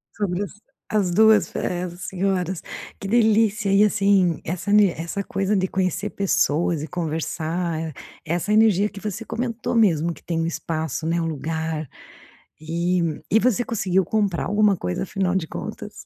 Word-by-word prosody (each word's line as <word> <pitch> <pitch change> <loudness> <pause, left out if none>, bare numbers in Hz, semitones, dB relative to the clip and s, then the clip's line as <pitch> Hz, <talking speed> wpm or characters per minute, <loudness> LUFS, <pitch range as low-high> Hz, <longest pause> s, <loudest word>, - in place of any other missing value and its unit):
Sobre 200 -1 -1
as - - -6 0.4
as 205 -4 +2
2 220 +4 +5
fe - - -7
é 180 0 -2
senhoras, 185 0 -2 0.4
que 195 - -5
delícia 220 -1 +3
e 200 - +6
assim 195 -4 +3
essa 180 +4 -3
ne 205 -3 +6
essa 170 +5 -4
coisa 195 +2 -1
de 190 0 +1
conhecer 190 +2 -1
pessoas 170 -4 +1
eh 160 - -5
conversar, 165 0 -3 0.3
essa 175 +5 -1
energia 215 -2 +4
que 205 - -10
você 215 +2 -5
comentou 235 0 -3
mesmo 170 -7 +3
que - - -16
tem 165 -1 -1
espaço, 160 -2 -3
né, 170 +1 +1
lugar 160 -1 -3 0.7
e 170 0 -1
e 220 - +5
você 245 0 +2
conseguiu 190 -6 +1
comprar 200 -3 0
alguma 205 -1 +3
coisa 90 - -3
afinal 190 -1 -1
de 170 - -1
contas? - - -7
185 Hz, 155 wpm, -23 LUFS, 165-205 Hz, 0.7 s, e